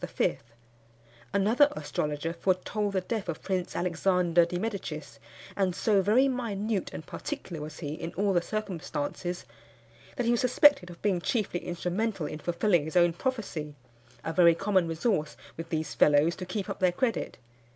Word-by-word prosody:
Another 225 Hz, +9 st, +4 dB
astrologer 150 Hz, +1 st, -2 dB
foretold 195 Hz, +3 st, -1 dB
the 190 Hz, -, +1 dB
death 200 Hz, 0 st, -3 dB
of 160 Hz, -, -4 dB
Prince 185 Hz, -2 st, -2 dB
Alexander 175 Hz, -1 st, +2 dB
di 175 Hz, -, -3 dB
Medicis; 185 Hz, -7 st, -5 dB, 0.4 s
and 190 Hz, -3 st, +1 dB
so 205 Hz, -1 st, +3 dB
very 230 Hz, +8 st, +4 dB
minute 220 Hz, -5 st, -2 dB
and 160 Hz, -, -7 dB
particular 185 Hz, -, -6 dB
was 155 Hz, +1 st, -7 dB
he 145 Hz, -, -3 dB
in 165 Hz, +1 st, -5 dB
all 200 Hz, +1 st, +1 dB
the 175 Hz, -, +3 dB
circumstances, 175 Hz, -3 st, -4 dB, 0.7 s
that 245 Hz, -, -1 dB
he 235 Hz, -, +3 dB
was 240 Hz, -, +2 dB
suspected 255 Hz, -5 st, +5 dB
of 175 Hz, -, -11 dB
being 190 Hz, -4 st, +1 dB
chiefly 205 Hz, -4 st, -1 dB
instrumental 180 Hz, +2 st, -2 dB
in 150 Hz, +1 st, -5 dB
fulfilling 175 Hz, 0 st, +2 dB
his 160 Hz, +3 st, -2 dB
own 175 Hz, -1 st, +5 dB
prophecy 175 Hz, -, -3 dB, 0.5 s
a 160 Hz, -, -3 dB
very 170 Hz, 0 st, +6 dB
common 190 Hz, -2 st, +2 dB
resource 165 Hz, -1 st, -1 dB, 0.2 s
with 165 Hz, 0 st, -7 dB
these 160 Hz, -2 st, -2 dB
fellows 150 Hz, +3 st, +4 dB
to 185 Hz, -, -7 dB
keep 190 Hz, +1 st, -3 dB
up -, -, -5 dB
their 185 Hz, -1 st, +4 dB
credit. 230 Hz, +5 st, -1 dB
180 Hz, 160 wpm, -29 LUFS, 165-210 Hz, 0.7 s, very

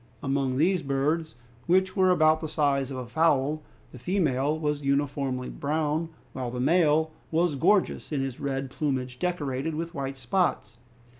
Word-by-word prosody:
Among 135 Hz, -2 st, 0 dB
these 180 Hz, +4 st, +3 dB
birds, 150 Hz, +3 st, -1 dB, 0.3 s
which 185 Hz, +2 st, +3 dB
were 190 Hz, -2 st, +4 dB
about 155 Hz, -3 st, +4 dB
the 160 Hz, -, -4 dB
size 140 Hz, -3 st, +1 dB
of 135 Hz, -, -5 dB
a 125 Hz, -, -4 dB
fowl, 155 Hz, +1 st, +1 dB, 0.3 s
the 125 Hz, -, -11 dB
female 150 Hz, -, +1 dB
was 150 Hz, -2 st, -1 dB
uniformly 140 Hz, -2 st, -1 dB
brown, 155 Hz, +2 st, -1 dB, 0.2 s
while 130 Hz, -2 st, -3 dB
the 125 Hz, +1 st, -5 dB
male 160 Hz, +2 st, +3 dB, 0.2 s
was 165 Hz, 0 st, +2 dB
gorgeous 185 Hz, +8 st, +1 dB
in 145 Hz, -, 0 dB
his 135 Hz, -2 st, -3 dB
red 135 Hz, -1 st, -3 dB
plumage, 130 Hz, -4 st, -2 dB
decorated 155 Hz, -4 st, -2 dB
with 165 Hz, +2 st, -4 dB
white 135 Hz, -3 st, -4 dB
spots. 120 Hz, -, -1 dB
145 Hz, 155 wpm, -27 LUFS, 135-160 Hz, 0.3 s, were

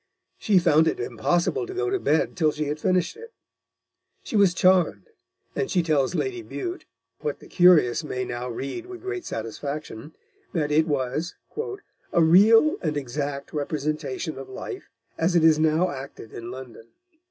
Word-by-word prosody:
She 205 Hz, -3 st, +3 dB
found 160 Hz, -2 st, +4 dB
it -, -, 0 dB
impossible 175 Hz, -, 0 dB
to 380 Hz, -, -7 dB
go 390 Hz, 0 st, -1 dB
to 390 Hz, -, +1 dB
bed 160 Hz, -, +1 dB
till 155 Hz, -4 st, +2 dB
she 150 Hz, +1 st, -3 dB
had 150 Hz, +1 st, -3 dB
finished 180 Hz, 0 st, +1 dB
it. 465 Hz, 0 st, -12 dB, 0.9 s
She -, -, -6 dB
was 195 Hz, -4 st, +4 dB
charmed, 185 Hz, -, +2 dB, 0.4 s
and 405 Hz, -, -1 dB
she 180 Hz, -3 st, +2 dB
tells 155 Hz, -1 st, +1 dB
Lady 370 Hz, -, -2 dB
Bute, 355 Hz, +1 st, -6 dB, 0.3 s
what 460 Hz, -, -3 dB
the -, -, -16 dB
curious 165 Hz, -8 st, +5 dB
may 130 Hz, -4 st, -3 dB
now 120 Hz, +1 st, -4 dB
read 140 Hz, -, -5 dB
with 370 Hz, 0 st, -10 dB
great 380 Hz, -2 st, -4 dB
satisfaction, 140 Hz, +4 st, -6 dB, 0.4 s
that 150 Hz, -4 st, 0 dB
it 155 Hz, +2 st, +3 dB
was 145 Hz, +3 st, -2 dB, 0.8 s
"a 170 Hz, -, +4 dB
real 215 Hz, -, +6 dB
and 155 Hz, -4 st, -1 dB
exact 140 Hz, +1 st, -4 dB
representation 150 Hz, -1 st, -3 dB
of 135 Hz, -, -9 dB
life, 195 Hz, -, -7 dB, 0.3 s
as 175 Hz, +2 st, +2 dB
it 170 Hz, -, +4 dB
is 160 Hz, -1 st, +5 dB
now 160 Hz, +3 st, +2 dB
acted 135 Hz, -5 st, -9 dB
in 115 Hz, 0 st, -7 dB
London." 125 Hz, -3 st, -10 dB
160 Hz, 165 wpm, -25 LUFS, 140-190 Hz, 0.9 s, real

